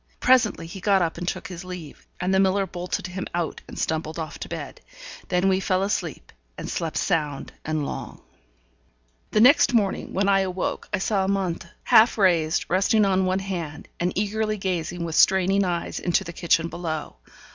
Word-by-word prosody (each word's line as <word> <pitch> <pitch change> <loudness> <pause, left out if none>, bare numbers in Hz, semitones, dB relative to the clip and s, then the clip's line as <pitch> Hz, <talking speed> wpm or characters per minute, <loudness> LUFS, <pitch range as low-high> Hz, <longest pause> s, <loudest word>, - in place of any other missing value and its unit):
Presently 255 -8 +3
he 170 +4 -8
got 195 -1 +3
up 165 0 -2
and 175 - -5
took 165 - -3
his 180 0 -8
leave; 180 -5 -9
and 185 +1 0
the 190 - +4
miller 195 +1 +3
bolted 180 0 -4
him 185 +1 -5
out, 170 -2 -2
and - - -10
stumbled 160 0 -2
off 155 -3 -5
to - - -7
bed. - - -7 0.5
Then 180 +1 +1
we 190 -1 +3
fell 190 0 +1
asleep, 170 - -3 0.3
and - - -6
slept 165 -2 -3
sound 150 -6 -1
and 155 -2 -1
long. - - -6 1.1
The 215 - +2
next 250 0 +6
morning, 200 -4 0
when 195 +1 0
I 195 -1 +4
awoke, 185 -1 -2
I - - +1
saw 195 0 0
Amante, 190 -3 -1 0.2
half 225 +2 +5
raised, 170 -5 +2
resting 200 +4 +3
on 190 -1 +2
one 185 0 +1
hand, 170 -6 -5
and 175 +1 0
eagerly 215 +2 -1
gazing, 175 -2 -2
with 165 - -4
straining 190 +3 +4
eyes, 175 -2 -2
into 175 - +1
the 170 - -8
kitchen 165 -1 +1
below. 160 - -5
185 Hz, 180 wpm, -24 LUFS, 170-195 Hz, 1.1 s, next